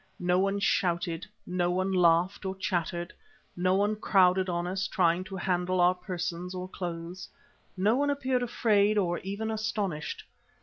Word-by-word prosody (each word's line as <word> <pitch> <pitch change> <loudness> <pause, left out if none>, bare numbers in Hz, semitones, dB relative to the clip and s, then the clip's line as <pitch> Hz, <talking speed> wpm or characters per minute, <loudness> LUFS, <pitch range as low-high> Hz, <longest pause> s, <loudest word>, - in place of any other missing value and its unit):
No 180 0 +2
one 195 +1 +1
shouted, 175 -3 0 0.2
no 180 -1 0
one 185 +2 0
laughed 180 +1 +3
or 190 0 -3
chattered. 175 -2 -2 0.4
No 185 +1 +2
one 205 +2 +2
crowded 190 -3 +3
on 175 0 -1
us, 190 +2 -2
trying 175 0 +2
to 195 - -7
handle 185 -1 0
our 175 +1 +5
persons 180 -1 -5
or 180 0 -4
clothes. 175 0 -6 0.5
No 205 +5 +3
one 285 +1 +1
appeared 265 -3 0
afraid 215 -3 +2
or 175 -4 +1
even 200 +4 -4
astonished. 210 -8 -3
185 Hz, 155 wpm, -29 LUFS, 175-200 Hz, 0.5 s, our